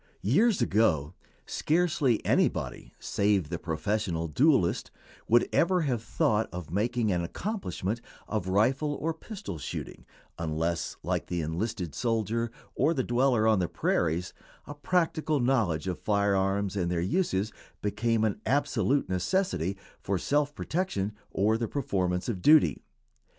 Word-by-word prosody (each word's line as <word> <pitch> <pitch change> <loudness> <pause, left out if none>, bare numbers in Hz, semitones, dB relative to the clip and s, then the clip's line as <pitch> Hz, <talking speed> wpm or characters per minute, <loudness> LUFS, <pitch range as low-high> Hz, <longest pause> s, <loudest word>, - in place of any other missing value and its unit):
] - - -38
Years 210 - +4
ago 90 -9 +2 0.3
scarcely 155 -7 +1
anybody - - 0
save 100 -6 +1
the 85 -1 -3
professional 85 +1 -1
duelist 125 - +2 0.4
would 120 +2 +4
ever 180 +1 +3
have 130 -7 0
thought 110 0 +1
of 90 -3 -7
making 110 +3 +1
an 90 -1 +1
accomplishment 115 - -3 0.3
of 105 -4 -2
rifle 130 +10 +2
or 165 +3 -2
pistol 190 - -7
shooting, - - -6 0.4
unless, 85 +1 -2
like - - -1
the 85 -1 -2
enlisted 90 +1 -3
soldier 115 0 0 0.2
or 165 - +2
the 130 - +1
dweller 120 -2 +2
on 110 -3 +4
the 90 - +1
prairies, 85 +1 0 0.3
a 145 - -7
practical 155 -1 0
knowledge 110 - +1
of 90 - -2
fire 100 -1 +2
arms 95 +1 0
and 90 -3 0
their 90 -1 0
uses 105 - 0 0.3
became 110 +2 +1
an 105 -1 0
absolute 140 0 +1
necessity 95 - 0 0.2
for 100 -1 -1
self 145 +8 0
protection 105 - -2 0.2
or 110 +3 +1
the 115 - -1
performance 90 -10 -1
of 105 -7 -3
duty. 155 - +5
110 Hz, 140 wpm, -28 LUFS, 90-140 Hz, 0.4 s, duty